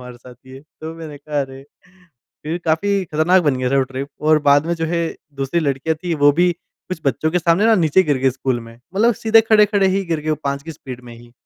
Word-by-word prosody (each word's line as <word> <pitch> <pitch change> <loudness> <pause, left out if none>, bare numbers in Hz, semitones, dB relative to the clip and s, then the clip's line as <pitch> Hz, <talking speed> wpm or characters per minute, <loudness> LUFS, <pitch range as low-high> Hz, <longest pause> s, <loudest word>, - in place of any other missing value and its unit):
हमारे 125 -1 -10
साथ 125 0 -14
ये। 130 +1 -11 0.2
तो 160 +1 -6
मैंने 155 -3 -9
कहा 150 0 -3
अरे! 135 0 -7 0.8
फिर 160 +3 -3
काफ़ी 190 +5 +1
खतरनाक 170 +3 +2
बन 145 -5 +1
गया 125 0 -1
था 140 - +2
वो - - +4
ट्रिप 135 +2 -5
और 155 0 +4
बाद 145 +2 +4
में 170 - 0
जो 165 - -3
है, 170 0 -1 0.3
दूसरी 135 +5 -1
लड़कियाँ 145 +1 -1
थी 175 -2 0
वो 145 -1 +4
भी 180 0 +4
कुछ 175 +1 -11
बच्चों 155 +5 0
के 180 - +1
सामने 170 +4 +2
ना 225 - +5
नीचे 175 0 +3
गिर 145 -6 0
गए 130 0 +2
स्कूल 130 -1 -2
में। 115 0 -12 0.2
मतलब 230 +4 +3
सीधे 225 +2 +4
खड़े-खड़े 210 -3 +3
ही 195 +1 0
गिर 165 -3 -2
गए, 155 +1 -3
वो 155 - +1
5 140 0 -2
की 160 - -8
स्पीड 130 -5 -10
में 120 -1 -11
ही। 120 0 -17
155 Hz, 245 wpm, -19 LUFS, 135-175 Hz, 0.8 s, ना